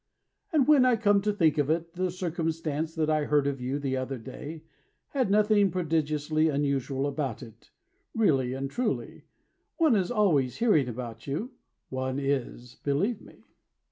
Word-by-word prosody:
And 295 -6 +3
when 295 -4 +6
I 255 -1 +4
come 205 -3 +3
to 210 +1 +1
think 160 -7 +2
of 145 0 +1
it 165 +1 -1
The 185 +1 -1
circumstance 165 -3 -3
that 160 -2 0
I 155 -1 +1
heard 145 -1 +2
of 140 -2 -2
you 130 +3 -2
The 135 -2 -2
other 130 +1 -3
day 145 +6 -8 0.5
Has 260 -7 0
nothing 210 -1 +4
prodigiously 155 -2 0
unusual 140 -2 -1
about 140 -4 -3
it. 115 -1 -15 0.5
Really 135 - +2
and 135 +1 -3
truly, 225 - -3 0.5
One 315 -8 +4
is 190 -3 +1
always 155 - +2
hearing 205 - +3
about 115 -1 -7
you. 180 - -3 0.4
One 130 0 -2
is, 135 -3 -3
believe 185 +11 0
me. - - -17
155 Hz, 160 wpm, -28 LUFS, 135-195 Hz, 0.5 s, when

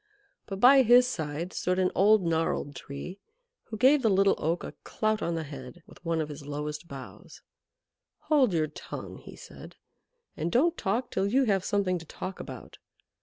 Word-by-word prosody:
But 195 -2 -5
by 265 +4 +7
his 245 +1 +6
side 165 -6 -4
stood 180 0 -1
an 185 -1 +2
old 205 0 +4
gnarled 160 -3 -1
Tree, 140 +9 -8 0.5
who 220 - -7
gave 265 +5 +5
the 225 - +3
Little 195 0 +4
Oak 165 +3 -1
a - - -6
clout 215 -1 -1
on 170 0 -1
the 165 - -3
head 140 +2 -10
with - - -18
one 165 -1 -1
of 155 -1 -2
his 145 0 -8
lowest 150 +2 -5
boughs. 130 - -11 0.8
"Hold 280 -8 +3
your 160 -3 +1
tongue," 150 - -8
he - - -12
said, - - -12 0.6
"and 165 +2 -3
don't 325 - +3
talk 230 - -2
till 190 +1 0
you 260 +6 +3
have 195 -6 +1
something 195 -4 0
to 165 - -12
talk 190 +4 -7
about. - - -9
185 Hz, 180 wpm, -28 LUFS, 155-220 Hz, 0.8 s, by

